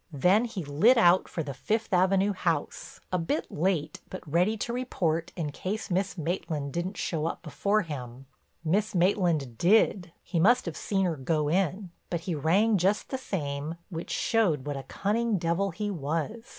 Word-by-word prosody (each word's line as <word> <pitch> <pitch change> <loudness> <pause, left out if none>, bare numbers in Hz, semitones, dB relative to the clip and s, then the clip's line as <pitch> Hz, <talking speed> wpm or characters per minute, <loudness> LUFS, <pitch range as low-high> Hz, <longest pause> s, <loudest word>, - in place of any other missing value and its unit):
Then 180 - +3
he 200 -8 -5
lit 190 - +4
out 180 -4 +5
for 165 - -3
the 140 -2 -5
Fifth 215 - -2
Avenue 190 +2 +3
house, 170 -5 -3
a 180 - +2
bit 165 - -2
late 160 -2 -1
but 185 -2 -8
ready 180 +8 +2
to 235 +3 -3
report 170 -10 -1
in 155 -4 -3
case 195 +7 -4
Miss 190 +2 0
Maitland 155 -4 -3
didn't 185 +3 -3
show 160 -2 -1
up - - -5
before 200 +7 0
him. 130 -5 -7 0.4
Miss 200 +6 +1
Maitland 170 - +1
did—he 175 -3 +2
must 240 +9 +4
have 170 -4 -4
seen 195 -2 0
her 170 -3 0
go 150 +2 0
in—but 180 -1 -2
he 180 0 -3
rang 190 +8 +3
just 195 +4 +1
the 265 - -2
same, 150 - -3 0.2
which 165 0 -5
showed 185 - +1
what 145 -1 -3
a 135 - -4
cunning 220 +2 0
devil 170 +3 0
he 205 +4 -3
was. 165 - -3
175 Hz, 170 wpm, -28 LUFS, 155-200 Hz, 0.4 s, out